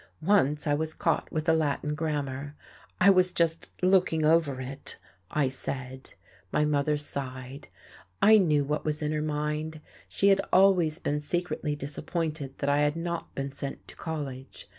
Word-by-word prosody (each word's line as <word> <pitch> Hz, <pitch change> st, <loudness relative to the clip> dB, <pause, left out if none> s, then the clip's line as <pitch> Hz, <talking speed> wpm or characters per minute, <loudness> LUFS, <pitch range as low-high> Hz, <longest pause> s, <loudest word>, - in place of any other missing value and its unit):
Once 155 Hz, -6 st, +3 dB
I 145 Hz, -, +2 dB
was 155 Hz, +1 st, -2 dB
caught -, -, 0 dB
with 155 Hz, +1 st, -2 dB
a 160 Hz, -, +5 dB
Latin 150 Hz, -1 st, 0 dB
grammar: 145 Hz, -2 st, -3 dB, 0.4 s
I 195 Hz, +2 st, +7 dB
was 185 Hz, -1 st, +4 dB
just 165 Hz, -1 st, 0 dB
"looking 185 Hz, -4 st, +3 dB
over 155 Hz, -4 st, +3 dB
it," 135 Hz, +2 st, -5 dB, 0.3 s
I 150 Hz, -3 st, +1 dB
said. 130 Hz, 0 st, -5 dB, 0.4 s
My 150 Hz, -, +2 dB
mother 150 Hz, 0 st, +1 dB
sighed. 135 Hz, -2 st, -6 dB, 0.5 s
I 215 Hz, +1 st, +7 dB
knew 150 Hz, -6 st, +3 dB
what 150 Hz, +2 st, -2 dB
was 155 Hz, 0 st, -1 dB
in 150 Hz, -, 0 dB
her 155 Hz, 0 st, -1 dB
mind; 150 Hz, +1 st, -2 dB, 0.3 s
she 200 Hz, -, +3 dB
had 195 Hz, 0 st, +4 dB
always 180 Hz, -5 st, +4 dB
been 145 Hz, 0 st, -1 dB
secretly 160 Hz, -1 st, -2 dB
disappointed 145 Hz, 0 st, -4 dB
that 140 Hz, -, -3 dB
I 145 Hz, +1 st, +3 dB
had 150 Hz, +1 st, +2 dB
not 170 Hz, 0 st, -4 dB
been 135 Hz, 0 st, -3 dB
sent 140 Hz, 0 st, -6 dB
to -, -, -11 dB
college. 140 Hz, -5 st, -6 dB
150 Hz, 160 wpm, -28 LUFS, 140-165 Hz, 0.5 s, I